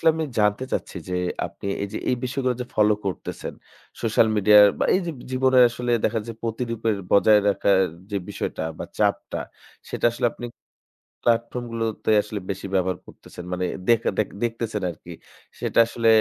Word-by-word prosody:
সলে 160 Hz, -, +5 dB
আমি 160 Hz, 0 st, -1 dB
জানতে 105 Hz, +4 st, +2 dB
চাচ্ছি -, -, -3 dB
যে, 90 Hz, -, -2 dB, 0.3 s
আপনি -, -, -10 dB, 0.2 s
এইযে 100 Hz, -, -4 dB
এই 125 Hz, -, +2 dB
বিষয়গুলো 130 Hz, 0 st, -1 dB
যে -, -, -2 dB
follow 105 Hz, 0 st, +4 dB
করতেছেন, 95 Hz, -, -4 dB, 0.5 s
social 115 Hz, 0 st, +3 dB
media-র 105 Hz, 0 st, +8 dB
বা -, -, +1 dB
এইযে 180 Hz, -2 st, 0 dB, 0.2 s
জীবনে 130 Hz, 0 st, +3 dB
আসলে 120 Hz, +1 st, -4 dB
দেখা 115 Hz, -, +2 dB
যায় 115 Hz, -1 st, -7 dB
প্রতিরূপের 115 Hz, -1 st, -1 dB
বজায় 105 Hz, +1 st, +6 dB
রাখার 100 Hz, -1 st, +3 dB, 0.3 s
যে 100 Hz, -, -1 dB
বিষয়টা -, -, -4 dB, 0.2 s
বা -, -, -4 dB
চাপটা, -, -, 0 dB, 0.5 s
সেটা -, -, -4 dB
আসলে 120 Hz, -, 0 dB
আপনি 120 Hz, -, -7 dB, 0.8 s
platform 120 Hz, +1 st, +1 dB
গুলোতে 115 Hz, -1 st, -2 dB
আসলে 105 Hz, 0 st, -6 dB
বেশি 95 Hz, 0 st, -4 dB
ব্যবহার 95 Hz, -1 st, +1 dB
করতেছেন, 90 Hz, -, -12 dB
মানে 90 Hz, 0 st, -1 dB, 0.2 s
দেখা 115 Hz, -1 st, +4 dB
দেখ 105 Hz, -, +2 dB, 0.2 s
দেখতেছেন 115 Hz, -3 st, -2 dB
আরকি, 85 Hz, +1 st, -13 dB, 0.5 s
সেটা -, -, +1 dB
আসলে 115 Hz, 0 st, -1 dB
115 Hz, 160 wpm, -24 LUFS, 105-120 Hz, 0.8 s, media-র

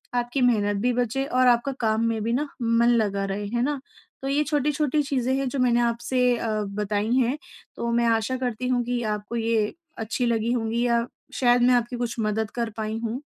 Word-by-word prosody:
आपकी 245 Hz, +2 st, 0 dB
मेहनत 210 Hz, -5 st, +2 dB
भी 250 Hz, 0 st, +2 dB
बचे 245 Hz, +2 st, 0 dB
और 255 Hz, -2 st, +2 dB
आपका 240 Hz, +3 st, +3 dB
काम 220 Hz, 0 st, +1 dB
में 225 Hz, -1 st, -1 dB
भी 230 Hz, +1 st, 0 dB
ना 290 Hz, +4 st, 0 dB
मन 230 Hz, +1 st, +3 dB
लगा 205 Hz, -4 st, +1 dB
रहे 200 Hz, +1 st, -3 dB
है 235 Hz, +3 st, -1 dB
ना, 290 Hz, +1 st, -1 dB, 0.4 s
तो -, -, -2 dB
ये 290 Hz, +2 st, +2 dB
छोटी-छोटी 295 Hz, 0 st, +1 dB
चीज़ें 260 Hz, -2 st, 0 dB
हैं 275 Hz, -1 st, -1 dB
जो 270 Hz, -, -3 dB
मैंने 240 Hz, -1 st, +3 dB
आपसे 245 Hz, +1 st, +1 dB
अ, 230 Hz, -, -3 dB, 0.3 s
बताई 210 Hz, +2 st, -1 dB
हैं। 260 Hz, +2 st, +2 dB, 0.4 s
तो 235 Hz, -, -2 dB
मैं 235 Hz, 0 st, +2 dB
आशा 230 Hz, +3 st, +1 dB
करती 250 Hz, -1 st, -3 dB
हूँ 245 Hz, -1 st, +1 dB
कि 245 Hz, 0 st, -1 dB
आपको 210 Hz, +3 st, -6 dB
ये 225 Hz, -2 st, +1 dB, 0.3 s
अच्छी 225 Hz, +3 st, -1 dB
लगी 230 Hz, 0 st, +1 dB
होंगी 230 Hz, 0 st, -1 dB
या 235 Hz, 0 st, +2 dB, 0.3 s
शायद 245 Hz, -1 st, +4 dB
मैं 250 Hz, +1 st, +5 dB
आपकी 240 Hz, +1 st, 0 dB
कुछ 240 Hz, -1 st, -2 dB
मदद 215 Hz, 0 st, -1 dB
कर 235 Hz, -2 st, -1 dB
पाई 220 Hz, 0 st, -3 dB
हूँ। 235 Hz, +5 st, -3 dB
235 Hz, 205 wpm, -25 LUFS, 225-250 Hz, 0.4 s, मैं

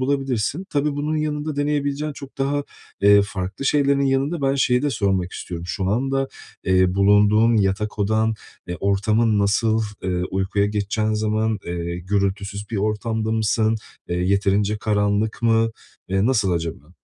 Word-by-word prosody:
bulabilirsin. 135 Hz, -, -1 dB
Tabii 145 Hz, +1 st, 0 dB
bunun 150 Hz, +2 st, -1 dB
yanında 150 Hz, -1 st, -2 dB
deneyebileceğin 145 Hz, 0 st, -1 dB
çok 140 Hz, -1 st, -11 dB
daha, 140 Hz, +1 st, 0 dB, 0.4 s
eee, 100 Hz, 0 st, +6 dB
farklı 95 Hz, +3 st, -5 dB
şeylerin 140 Hz, 0 st, +3 dB
yanında 140 Hz, +4 st, 0 dB
ben 135 Hz, 0 st, +2 dB
şeyi 125 Hz, -2 st, +2 dB
de 145 Hz, -, +1 dB
sormak 95 Hz, -6 st, 0 dB
istiyorum; 85 Hz, -1 st, -6 dB
şu 95 Hz, +2 st, -3 dB
anda, 135 Hz, +5 st, 0 dB, 0.4 s
eee, 95 Hz, -1 st, +3 dB
bulunduğun 105 Hz, +3 st, +4 dB
yatak 105 Hz, +1 st, 0 dB
odan, 110 Hz, +2 st, +1 dB, 0.3 s
eee, 90 Hz, -, -3 dB
ortamın 105 Hz, +3 st, +2 dB
nasıl? 110 Hz, +2 st, +2 dB, 0.2 s
Eee, 90 Hz, -1 st, -1 dB
uykuya 95 Hz, +1 st, 0 dB
geçeceğin 105 Hz, +1 st, -1 dB
zaman, 110 Hz, 0 st, 0 dB
eee, 85 Hz, 0 st, -3 dB
gürültüsüz 100 Hz, +2 st, -2 dB
bir 115 Hz, -, -2 dB
ortamda 110 Hz, +2 st, -1 dB
mısın? 110 Hz, 0 st, +1 dB, 0.3 s
Eee, 85 Hz, -, -1 dB
yeterince 100 Hz, +3 st, +1 dB
karanlık 105 Hz, +1 st, 0 dB
mı? 115 Hz, -1 st, +3 dB, 0.4 s
Eee, 95 Hz, +2 st, +1 dB
nasıl 110 Hz, -7 st, +2 dB
acaba? 85 Hz, -1 st, -4 dB
105 Hz, 145 wpm, -22 LUFS, 100-135 Hz, 0.4 s, eee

